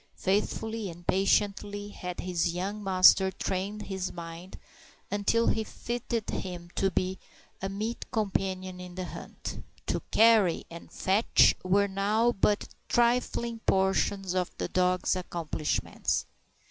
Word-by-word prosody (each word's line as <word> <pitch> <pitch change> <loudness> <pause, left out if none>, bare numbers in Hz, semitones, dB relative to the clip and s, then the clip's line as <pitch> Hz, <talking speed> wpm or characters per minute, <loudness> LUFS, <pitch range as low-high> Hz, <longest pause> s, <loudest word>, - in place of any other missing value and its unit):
Faithfully 210 +2 -1
and 175 +1 -11
patiently 205 +2 +1
had 180 -3 -6
his 175 -2 0
young 200 +4 -3
master 190 0 +6
trained 195 +2 -3
his 190 -2 -3
mind, 170 +2 -8 0.5
until 205 +3 +2
he 220 - +1
fitted 235 0 -4
him 175 -2 -5
to 195 - +1
be 185 0 -1 0.4
a 195 - -2
meet 215 +4 -4
companion 190 -5 -2
in 180 -1 -9
the 185 -1 -3
hunt. 170 0 -7 0.2
To - - -1
"carry" 220 -6 +5
and 170 0 -10
"fetch" 200 +4 +4
were 200 +2 +3
now 210 +4 +2
but 205 -1 +1 0.2
trifling 235 -1 +1
portions 190 0 +2
of 185 -1 0
the - - -2
dog's 185 0 +1
accomplishments. 170 -4 -2
195 Hz, 125 wpm, -29 LUFS, 185-210 Hz, 0.5 s, master